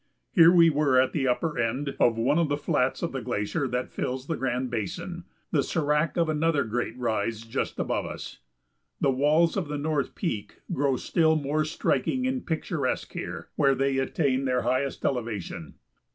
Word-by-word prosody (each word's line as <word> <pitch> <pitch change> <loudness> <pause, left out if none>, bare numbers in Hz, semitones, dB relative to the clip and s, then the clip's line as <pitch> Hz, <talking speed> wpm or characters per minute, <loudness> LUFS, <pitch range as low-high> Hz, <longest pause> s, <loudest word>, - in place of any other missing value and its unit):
Here 170 -5 +8
we 170 -2 +6
were 145 -3 +3
at 130 - +3
the 135 -4 0
upper 145 +2 0
end 130 +5 -1
of 115 -1 +4
one 125 +8 +2
of 165 -3 +1
the 145 - +1
flats 130 -1 0
of 170 - -1
the 135 - -4
glacier 110 +7 -1
that 125 0 -3
fills 130 +1 -3
the 165 - -2
Grand 130 -1 -2
Basin, 110 -5 -4 0.3
the - - +2
sérac 150 +1 +1
of 170 -1 +3
another 155 -1 +1
great 120 +1 -3
rise 115 -2 -1
just 115 - -3
above - - -1
us. - - -8 0.6
The 135 - +3
walls 150 +5 +3
of 190 -6 -1
the 150 0 -3
North 145 -1 -1
Peak 105 - -4
grow 140 -4 +1
still 160 +2 +2
more 155 +1 0
striking 160 - 0
and 260 -1 -1
picturesque 160 -4 -2
here, - - -6
where 135 -1 +3
they 135 0 +1
attain 135 -1 0
their 125 -1 +1
highest 130 +3 -1
elevation. 110 - -3
140 Hz, 180 wpm, -27 LUFS, 125-155 Hz, 0.6 s, Here